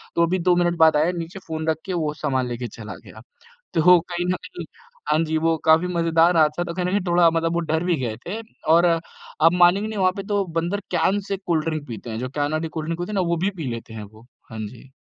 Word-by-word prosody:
तो 170 - +4
अभी 180 +2 -1
2 180 +1 +3
मिनट 175 0 +1
बाद 160 -2 +5
आया 155 +4 +2
नीचे 170 +3 -6
फ़ोन 160 -1 -4
रख 160 - +1
के, 190 - -3
वो 155 -3 -1
सामान 135 -4 -1
लेके 120 0 -4
चला 105 -3 -9
गया। 110 - -13 0.5
तो 175 +2 +6
कहीं 175 0 -4
न 180 - +1
कहीं, 175 - -8 0.5
हाँ 150 - +3
जी 160 0 -1
वो 165 +1 +2
काफ़ी 160 +3 +5
मज़ेदार 170 0 +2
हादसा 155 +1 +3
था, - - -8
तो 170 - -5
कहीं 180 -1 -1
न - - 0
कहीं 200 0 +1
थोड़ा 170 -1 +5
मतलब 165 0 0
वो 170 - +1
डर 160 +1 +1
भी 175 -1 +1
गए 115 -3 -2
थे। 205 +5 -4 0.3
और 170 +1 +5
आप 165 -1 0
मानेंगे 180 +4 +4
नहीं 215 -2 -4
वहाँ 185 -1 +3
पे 195 - -4
तो 205 -1 +1 0.2
बंदर 180 +5 -2 0.2
कैन 190 +4 +2
से 195 - -2
कोल्ड 170 -5 -1
ड्रिंक 155 -2 -3
पीते 115 0 -7
हैं। 110 - -4
जो 130 +1 -4
कैन 145 +1 -2
वाली 155 +1 -1
कोल्ड 155 0 -5
ड्रिंक 165 0 -3
होती 175 +4 -4
है 210 - -3
ना, 190 - +2
वो 170 -1 0
भी 190 +4 0
पी 155 - -4
लेते 115 -1 -7
हैं 110 - -7
वो। 110 +3 -15 0.3
हाँ 110 - -7
जी। 125 +4 -14
165 Hz, 265 wpm, -23 LUFS, 150-175 Hz, 0.5 s, तो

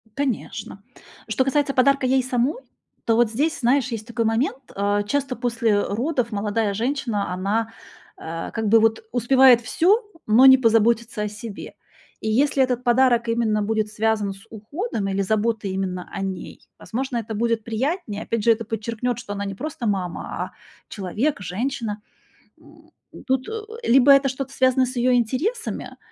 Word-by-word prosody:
Конечно. 255 -7 -4 0.5
Что 225 +4 +1
касается 275 +1 +1
подарка 275 +1 +3
ей 260 0 +2
самой, 255 - -1 0.4
то 225 - +3
вот 235 -1 +3
здесь, 295 +7 0
знаешь, 255 +2 +2
есть 225 0 -5
такой 235 -1 -1
момент, 230 +4 0 0.2
а. 205 +1 +1
Часто 270 +4 -2
после, 235 -2 0
э, 205 0 +2
родов 250 -1 -1
молодая 210 0 -1
женщина, 230 -4 -2
она, 215 +5 -1 0.5
а, 165 +1 -6
как 220 -1 -2
бы 225 +2 +6
вот 225 0 +2
успевает 250 0 +5
всё, 390 - +2 0.2
но 230 +5 +6
не 265 0 +9
позаботится 230 -1 +2
о - - -1
себе. 210 0 -8 0.5
И 220 - -3
если 270 +4 +3
этот 250 -1 -1
подарок 240 -1 +3
именно 225 -2 +1
будет 215 0 -1
связан 215 -2 0
с 195 +2 -16
уходом 225 - -4
или 195 0 -1
заботой 215 0 0
именно 185 -2 -3
о 195 - -5
ней, 190 -1 -6
возможно, 255 +1 -3
это 220 -1 -4
будет 230 0 0
приятнее. 230 - -3
Опять 230 -2 -2
же, 230 - +5
это 230 0 0
подчеркнёт, 230 +3 -3
что 205 -5 -6
она 200 0 -4
не 195 -1 -5
просто 270 -2 -4
мама, 185 -4 -2
а - - -5 0.4
человек, 210 - -2
женщина. 220 +2 -3 0.6
М. - - -20 0.2
Н - - -12
тут, 260 -1 0
э, - - -5 0.3
либо 265 +3 +6
это 275 0 +4
что-то 270 +1 -5
связано 260 0 +3
с 255 +1 -6
её 250 +1 +2
интересами, 270 - -2
230 Hz, 170 wpm, -23 LUFS, 210-260 Hz, 0.6 s, не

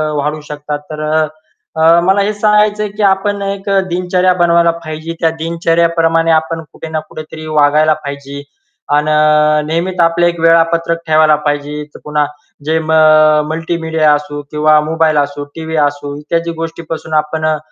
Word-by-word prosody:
वाढू 150 +1 -2
शकतात. 150 0 -5
तर 155 0 -5
अ, 155 0 +1 0.5
अ, 165 +1 +6
मला 190 +3 +2
हे 205 +2 0
सांगायच 210 0 +2
आहे 210 - -2
की 210 +1 -4
आपण 200 +1 +1
एक 200 0 -4 0.2
दिनचर्या 180 +1 +1
बनवायला 170 0 +4
पाहिजे. 155 +1 -6
त्या 165 - +2
दिनचर्याप्रमाणे 165 0 +1
आपण 160 +1 0
कुठे 160 - -9
ना 160 0 -2
कुठेतरी 155 0 -9
वागायला 155 0 +3
पाहिजे. 140 0 -7 0.5
अन 150 +1 +2 0.6
नेहमीच 175 +3 -2
आपल्या, 170 +1 +3
एक 170 -1 -6
वेळापत्रक 165 0 +2
ठेवायला 155 -1 +4
पाहिजे. 145 +1 -3
तर - - -10
पुन्हा 150 0 0 0.4
जे 160 +1 +1
म 160 - -3
अ, 155 -1 +5
मल्टीमीडिया 160 -1 0
असो 145 0 -3
किंवा 150 0 +3
मोबाईल 160 0 0
असो, 145 0 -1
टीव्ही 160 0 -5
असो 145 0 -6
इत्यादी 165 +3 -2
गोष्टीपासून 165 -1 -6
आपण 155 +1 -1
अ, 155 -1 +1
160 Hz, 155 wpm, -14 LUFS, 150-170 Hz, 0.6 s, अ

